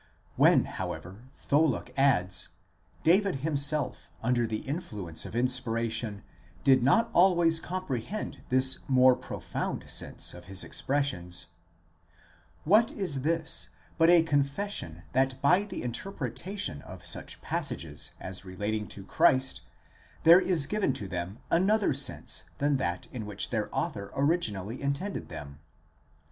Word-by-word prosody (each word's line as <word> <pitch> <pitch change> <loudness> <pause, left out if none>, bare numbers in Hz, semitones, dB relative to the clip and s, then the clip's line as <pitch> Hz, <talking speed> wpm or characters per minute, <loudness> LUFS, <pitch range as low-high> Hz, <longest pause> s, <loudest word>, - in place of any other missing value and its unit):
When, - - +5
however, 90 +6 -6
Tholuck 150 0 +1
adds: 95 -10 +2 0.5
David 190 +3 +4
him 160 -2 0
self, 140 -2 +2
under 120 0 +2
the 110 -1 -3
influence 105 - -4
of - - -9
inspiration, 115 -4 -1 0.4
did 130 -2 +5
not 145 - +3
always 175 -3 +5
comprehend 185 - -4
this 130 0 +4
more 130 -1 +6
profound - - -5
sense - - -3
of 90 0 -11
his 95 +1 -4
expressions; 90 - -1 1.1
what 215 +7 +4
is 155 -10 -1
this 160 +2 -1 0.3
but 165 +1 +6
a 175 -2 +7
confession 140 - -1
that 130 0 +1
by 180 +9 +4
the 210 - -6
interpretation 130 - -4
of - - -11
such - - -3
passages 75 -3 -3
as 95 0 -6
relating 105 +3 -3
to 100 - -6
Christ 130 +5 +3 0.6
there 170 +3 +8
is 175 -6 +2
given 205 -6 0
to 105 -6 -4
them 90 +2 -4
another 195 +1 +3
sense 135 -1 -2
than 145 0 +2
that 85 -7 -2
in 110 -5 -6
which 105 -2 -2
their - - -1
author 100 0 -3
originally 125 - 0
intended 140 +9 -3
them? 70 -1 -8
130 Hz, 130 wpm, -29 LUFS, 105-165 Hz, 1.1 s, there